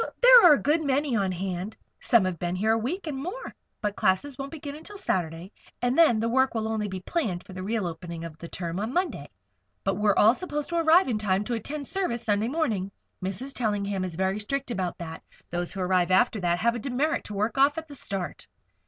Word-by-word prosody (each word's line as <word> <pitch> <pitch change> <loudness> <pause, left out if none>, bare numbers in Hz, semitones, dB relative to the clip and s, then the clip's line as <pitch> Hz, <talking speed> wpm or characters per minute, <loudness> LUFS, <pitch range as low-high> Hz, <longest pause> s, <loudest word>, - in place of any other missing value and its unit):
"There - - +9
are 310 - +9
a 285 - +2
good 305 +3 +2
many 280 -2 +1
on 195 -3 +1
hand. 185 +2 -4 0.2
Some 230 -5 +4
have 185 -2 -2
been 175 0 -2
here 215 +4 +1
a 225 - +3
week 340 - -3
and 305 -4 -3
more. 365 - -6 0.3
But 205 -1 -1
classes 220 +10 +1
won't 275 +2 -6
begin 290 -2 -7
until 405 +7 -10
Saturday, 175 - -2 0.3
and 245 +1 +1
then 305 -9 +5
the 225 - 0
work 260 +2 +2
will 220 -1 -1
only 220 -1 -1
be 190 -2 -5
planned 190 - -2
for 190 - -11
the 185 - -6
real 210 +1 -1
opening 170 0 -6
of 165 -2 -8
the 170 - -7
term 170 +1 -4
on 220 +5 -3
Monday. 325 - -1 0.5
But 195 -1 0
we're 210 -1 +3
all 220 +2 +7
supposed 295 -1 -4
to 340 - -1
arrive 330 +3 +5
in 225 -4 0
time 195 -1 +1
to 240 - -3
attend 280 +5 -4
service 300 -12 -2
Sunday 210 0 +1
morning. 230 - -1 0.3
Mrs. 220 +9 -4
Tellingham 205 -5 -1
is 180 -3 -4
very 190 +3 0
strict 265 +4 -3
about 185 -6 -2
that. 165 -1 -7 0.3
Those 175 0 -2
who 195 - -4
arrive 180 -1 +2
after 215 +2 +3
that 175 -1 +1
have 235 +6 +2
a 240 - -4
demerit 275 +6 -1
to 210 - -6
work 215 +6 -1
off 285 +2 +4
at 320 0 -5
the 290 - -10
start." 195 -9 -4
220 Hz, 230 wpm, -27 LUFS, 185-280 Hz, 0.5 s, There